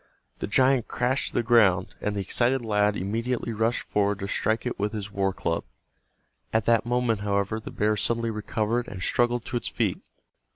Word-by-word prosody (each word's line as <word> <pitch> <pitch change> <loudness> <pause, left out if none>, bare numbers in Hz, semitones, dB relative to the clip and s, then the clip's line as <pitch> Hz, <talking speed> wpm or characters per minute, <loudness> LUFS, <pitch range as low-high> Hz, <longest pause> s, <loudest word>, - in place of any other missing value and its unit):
The - - -3
giant 130 +2 +3
crashed 125 +2 0
to - - -5
the - - +2
ground, 105 -6 +4
and 105 0 -1
the 100 - -1
excited 120 +5 +1
lad 105 -1 +2
immediately 115 +5 -2
rushed 110 +2 0
forward 100 -1 0
to 100 -1 -4
strike 110 +4 0
it 125 - -3
with 105 +2 -1
his 100 -2 -5
war 95 -1 0
club. 85 -3 -2 0.9
At 110 -1 +1
that 115 0 +3
moment, 120 -3 +1
however, 100 +1 -1
the 110 - -8
bear 105 +1 +1
suddenly 115 +2 0
recovered 110 +2 -1
and 95 -3 -6
struggled 120 -1 +1
to 120 - -2
its - - -2
feet. - - -1
110 Hz, 190 wpm, -26 LUFS, 100-120 Hz, 0.9 s, ground